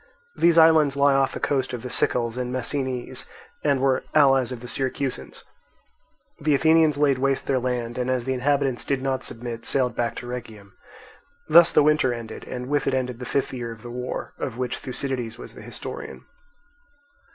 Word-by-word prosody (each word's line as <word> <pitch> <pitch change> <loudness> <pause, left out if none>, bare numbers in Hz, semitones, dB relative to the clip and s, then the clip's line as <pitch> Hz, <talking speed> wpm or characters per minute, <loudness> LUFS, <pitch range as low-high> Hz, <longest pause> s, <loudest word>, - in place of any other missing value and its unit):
These 170 0 +4
islands 160 -4 +6
lie 140 0 +5
off 135 -1 +2
the - - -4
coast 130 -3 -1
of 120 - -5
the 125 - -5
Sicels 120 -2 0
and 125 -1 -3
Messinese, 130 0 -3 0.4
and 140 -2 +2
were 130 -1 +2
allies 135 -4 +5
of 125 - -5
the 125 - -8
Syracusans. 135 +1 -3 1.0
The 150 -1 +2
Athenians 160 0 +4
laid 140 -3 +2
waste 135 0 0
their 135 -2 +1
land, 125 -1 -3
and 125 0 -1
as 125 -2 0
the 130 - 0
inhabitants 135 -1 0
did 135 -2 -1
not 135 -1 -1
submit, 115 0 -6
sailed 125 -3 +1
back 120 -1 -1
to - - -7
Rhegium. 110 -5 -8 0.8
Thus 170 0 +7
the - - +5
winter 150 -4 +3
ended, 115 -2 -7
and 125 0 -6
with 145 +1 0
it 130 - +2
ended 125 -2 -2
the 125 - -6
fifth 140 - -1
year 120 -2 -4
of 115 -1 -11
this 120 - -8
war, 125 +1 -5
of 120 -3 -4
which 125 -1 -3
Thucydides 125 -3 -4
was - - -10
the - - -12
historian. - - -8
130 Hz, 185 wpm, -24 LUFS, 125-140 Hz, 1.0 s, Thus